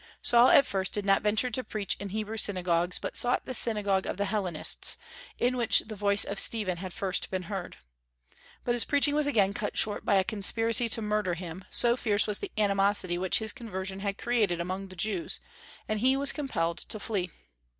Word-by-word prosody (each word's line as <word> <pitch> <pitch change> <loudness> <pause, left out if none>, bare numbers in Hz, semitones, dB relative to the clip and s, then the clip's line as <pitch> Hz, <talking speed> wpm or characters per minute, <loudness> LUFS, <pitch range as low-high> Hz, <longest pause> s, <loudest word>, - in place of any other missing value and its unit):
Saul 240 +1 +5
at 280 - +6
first 190 -1 -3
did 205 -1 -1
not 195 0 +3
venture 215 +4 +2
to 255 +3 -2
preach 210 -4 -3
in 200 - -6
Hebrew 215 +2 -4
synagogues, 180 -4 0
but - - -6
sought 245 +1 +1
the 260 - -5
synagogue 205 -5 +1
of - - -4
the 200 - -1
Hellenists, 190 -6 0 0.4
in 245 +1 0
which 240 -2 +2
the 215 - -9
voice 200 0 +3
of 200 - -2
Stephen 205 -6 +2
had 185 +1 -6
first 195 -2 -2
been 185 -1 -3
heard. 190 0 -6 0.9
But 240 - 0
his 240 - +3
preaching 285 0 +2
was 300 -1 +2
again 200 -8 +2
cut 205 0 -4
short 210 -1 +2
by 205 - +2
a 190 - +4
conspiracy 225 +3 +2
to 225 0 0
murder 210 -4 -1
him, 175 +1 -8
so 240 0 +2
fierce 215 -4 +3
was 210 -1 0
the - - -6
animosity 200 -3 +1
which 185 0 +1
his 220 -1 -1
conversion 190 -6 -6
had 200 0 -3
created 215 -8 0
among 185 +3 -4
the 185 - -9
Jews, 220 - -2 0.5
and 215 0 -2
he 260 +4 +3
was 280 0 +4
compelled 170 - -2
to 215 - -3
flee. 195 -4 -2
205 Hz, 200 wpm, -28 LUFS, 190-230 Hz, 0.9 s, at